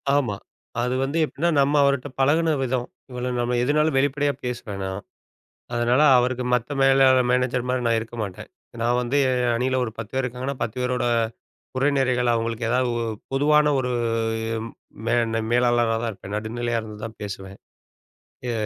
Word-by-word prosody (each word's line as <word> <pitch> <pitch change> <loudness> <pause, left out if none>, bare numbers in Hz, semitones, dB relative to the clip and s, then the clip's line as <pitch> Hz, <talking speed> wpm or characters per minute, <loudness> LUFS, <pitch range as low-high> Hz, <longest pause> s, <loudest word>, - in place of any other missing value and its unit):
ஆமா, 120 -8 +1 0.5
அது 125 +1 0
வந்து 140 +5 -2
எப்டின்னா, 170 +4 -1
நம்ம 140 +2 +3
அவருட்ட 140 0 +1
பழகுன 160 +4 +3
விதம். 125 -1 -1 0.2
இவ்வளோ 125 0 -3
நம்ம 120 +1 0
எதுனாலும் 150 +2 +2
வெளிப்படையா 145 +1 +1
பேசுவேன் 115 -5 -4
நான். 95 +1 -4 0.7
அதனால 120 +4 +3 0.2
அவருக்கு 125 0 0
மத்த 125 +4 -1
மேலாளர் 135 -2 +5
மேனேஜர் 125 0 +1
மாரி 125 -1 0
நான் 115 -1 +3
இருக்க 115 +1 -9
மாட்டேன். 95 -3 -7 0.3
நான் 120 +1 +2
வந்து 125 +4 -1
என் 125 -2 +1
அணியில 130 +2 0
ஒரு 110 - -4
10 110 +1 -7
பேர் 135 0 0
இருக்காங்கன்னா 125 +2 -4
10 115 0 -3
பேரோட 125 0 0 0.7
குறை 135 +3 +2
நிறைகள் 125 -2 +2
அவங்களுக்கு 115 0 -2
ஏதாவது 125 +1 +2
உ - - -2 0.3
பொதுவான 150 +2 +4
ஒரு 125 -1 -1 1.2
மேன்ன 115 -1 +1
மேலாளரா 120 -2 +3
தான் 115 - -1
இருப்பேன். 100 +1 -8
நடுநிலையா 115 +2 -2
இருந்துதான் 110 +1 -8
பேசுவேன். 95 -1 -7 0.9
ய - - -1
125 Hz, 155 wpm, -24 LUFS, 115-135 Hz, 1.2 s, மேலாளர்